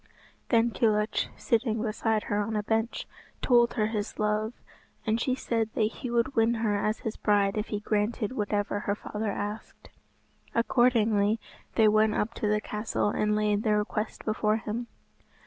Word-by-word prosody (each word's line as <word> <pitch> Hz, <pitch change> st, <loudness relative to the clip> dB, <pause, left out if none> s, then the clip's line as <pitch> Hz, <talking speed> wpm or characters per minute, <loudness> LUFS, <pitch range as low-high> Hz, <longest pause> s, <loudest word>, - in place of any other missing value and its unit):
Then 230 Hz, -1 st, +3 dB
Kilhuch, 215 Hz, -2 st, +1 dB
sitting 230 Hz, -1 st, +1 dB
beside 220 Hz, -1 st, 0 dB
her 205 Hz, -, -1 dB
on 220 Hz, +2 st, -2 dB
a 210 Hz, -, 0 dB
bench, 225 Hz, +2 st, -1 dB, 0.3 s
told 240 Hz, -2 st, +4 dB
her 215 Hz, -3 st, +2 dB
his 215 Hz, -1 st, -3 dB
love, 215 Hz, +2 st, 0 dB, 0.5 s
and 225 Hz, +1 st, +1 dB
she 255 Hz, +1 st, +1 dB
said 230 Hz, -3 st, -1 dB
that -, -, 0 dB
he 225 Hz, +4 st, -3 dB
would 240 Hz, +3 st, 0 dB
win 225 Hz, +1 st, +3 dB
her 220 Hz, -2 st, 0 dB
as 215 Hz, +2 st, -1 dB
his 220 Hz, -, -4 dB
bride 200 Hz, -1 st, +2 dB
if 210 Hz, 0 st, -2 dB
he 210 Hz, -, -2 dB
granted 210 Hz, +1 st, -1 dB
whatever 205 Hz, -3 st, -1 dB
her 200 Hz, 0 st, -1 dB
father 210 Hz, +1 st, -4 dB
asked. 205 Hz, +2 st, -6 dB, 0.7 s
Accordingly 225 Hz, -3 st, +3 dB, 0.4 s
they 220 Hz, -2 st, +5 dB
went 215 Hz, 0 st, +4 dB
up 225 Hz, +2 st, -1 dB
to 215 Hz, -, -2 dB
the 210 Hz, 0 st, +2 dB
castle 210 Hz, 0 st, -2 dB
and 210 Hz, 0 st, +1 dB
laid 210 Hz, -1 st, +1 dB
their 215 Hz, -1 st, +2 dB
request 210 Hz, +1 st, -3 dB
before 215 Hz, 0 st, +1 dB
him. 225 Hz, +2 st, -4 dB
215 Hz, 165 wpm, -28 LUFS, 210-230 Hz, 0.7 s, they